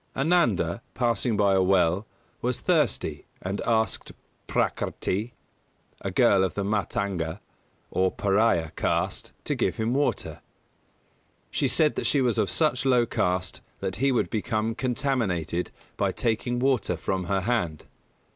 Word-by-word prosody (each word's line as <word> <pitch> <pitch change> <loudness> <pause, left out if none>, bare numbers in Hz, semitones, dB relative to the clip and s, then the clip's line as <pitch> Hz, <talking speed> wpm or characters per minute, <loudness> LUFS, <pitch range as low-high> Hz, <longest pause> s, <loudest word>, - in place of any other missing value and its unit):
Ananda, 135 - +2
passing 120 -2 +1
by 100 -1 +4
a 95 - +4
well, 95 +1 +2 0.3
was 125 0 -1
thirsty 155 - 0
and 95 +2 -3
asked 110 -1 0 0.3
Prakrti, 110 +6 -1 0.7
a - - -2
girl 95 -2 +4
of 95 - -1
the 100 - -1
Mātanga, 100 -4 -1 0.5
or 95 0 +2
Pariah, 100 -5 +2
caste, - - -1
to - - -1
give - - 0
him 110 +2 -1
water. 145 +2 -1 1.1
She - - +1
said 155 -2 +2
she 145 - +3
was 125 -4 +2
of - - +1
such 150 -6 +1
low 125 -3 +4
caste 90 -4 -1 0.2
that 95 - -3
he 135 +1 +2
would 125 - 0
become 110 0 -1
contaminated 115 - -1 0.3
by - - +1
taking 120 +1 -1
water 130 -4 +1
from 95 -1 -2
her 95 +2 0
hand. 90 -8 -1
110 Hz, 135 wpm, -26 LUFS, 95-125 Hz, 1.1 s, by